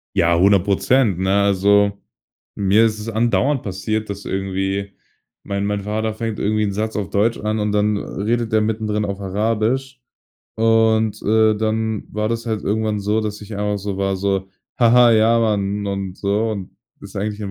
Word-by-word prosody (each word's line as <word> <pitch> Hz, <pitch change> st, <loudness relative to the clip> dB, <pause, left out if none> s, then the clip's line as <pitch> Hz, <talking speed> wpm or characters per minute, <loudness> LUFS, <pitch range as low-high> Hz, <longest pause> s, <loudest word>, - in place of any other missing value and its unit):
Ja, 85 Hz, 0 st, +3 dB
100 100 Hz, 0 st, +4 dB
Prozent 100 Hz, +1 st, +2 dB
ne? 95 Hz, 0 st, 0 dB
Also, 100 Hz, +1 st, +3 dB, 0.6 s
mir 100 Hz, +3 st, +3 dB
ist 110 Hz, -1 st, -1 dB
es 105 Hz, +2 st, -5 dB
andauernd 120 Hz, +5 st, +1 dB
passiert, 105 Hz, +3 st, -3 dB
dass 100 Hz, 0 st, -6 dB
irgendwie 95 Hz, +1 st, -2 dB, 0.5 s
mein 100 Hz, 0 st, -2 dB
mein 105 Hz, 0 st, -1 dB
Vater 110 Hz, +2 st, -2 dB
fängt 110 Hz, -1 st, -4 dB
irgendwie 110 Hz, +1 st, 0 dB
'n 100 Hz, -1 st, -1 dB
Satz 110 Hz, +2 st, -3 dB
auf 100 Hz, -2 st, -3 dB
Deutsch 110 Hz, +3 st, +1 dB
an 110 Hz, +1 st, -2 dB
und 105 Hz, 0 st, 0 dB
dann 105 Hz, 0 st, +1 dB
redet 115 Hz, +4 st, -2 dB
der 110 Hz, 0 st, +3 dB
mittendrin 105 Hz, -1 st, -1 dB
auf 100 Hz, -1 st, -4 dB
Arabisch. 115 Hz, +7 st, -1 dB, 0.6 s
Und, 110 Hz, -1 st, +2 dB
äh, 110 Hz, 0 st, +3 dB
dann 110 Hz, 0 st, -1 dB
war 105 Hz, 0 st, -1 dB
das 115 Hz, 0 st, -3 dB
halt 110 Hz, -3 st, -2 dB
irgendwann 110 Hz, 0 st, -1 dB
so, 105 Hz, +2 st, 0 dB
dass 105 Hz, -1 st, -4 dB
ich 105 Hz, 0 st, -8 dB
einfach 105 Hz, 0 st, -1 dB
so 100 Hz, 0 st, -4 dB
war 95 Hz, 0 st, 0 dB
so: 95 Hz, 0 st, -1 dB, 0.3 s
„Ha 120 Hz, -2 st, +4 dB
ha, 125 Hz, -1 st, +7 dB
ja, 115 Hz, +1 st, +4 dB
Mann“ 105 Hz, -2 st, 0 dB
und 100 Hz, -2 st, -4 dB
so, 105 Hz, +3 st, 0 dB
und 100 Hz, -4 st, -6 dB, 0.2 s
das -, -, -11 dB
eigentlich 105 Hz, +1 st, -3 dB
im 100 Hz, -2 st, -4 dB
105 Hz, 180 wpm, -20 LUFS, 100-110 Hz, 0.6 s, ha